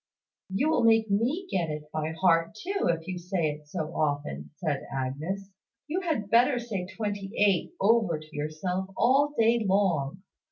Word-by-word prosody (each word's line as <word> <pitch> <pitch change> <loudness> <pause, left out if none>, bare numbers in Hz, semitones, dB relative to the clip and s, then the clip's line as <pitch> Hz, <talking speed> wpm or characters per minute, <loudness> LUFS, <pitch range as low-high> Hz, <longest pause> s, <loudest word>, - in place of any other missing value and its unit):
'" - - -65
"You 260 +12 +1
will 245 - +2
make 225 -2 +4
me 260 - +1
get 170 -4 0
it 150 0 -6
by 155 +1 -2
heart 165 +1 +3
too, 390 - -2
if 165 0 -1
you 185 -1 -4
say 175 -3 0
it 150 0 -11
so 155 +2 -4
often," 145 - -1
said - - -2
Agnes. 155 +10 -3 0.4
"You 340 +5 -1
had 285 - -2
better 245 +3 +5
say 215 -7 -3
`twenty 205 -3 -3
eight' 200 - +2
over 210 -6 +3
to 155 0 -13
yourself 155 +6 -2
all 285 +4 +3
day 230 0 +4
long. 190 -5 +1
190 Hz, 170 wpm, -28 LUFS, 155-230 Hz, 0.4 s, better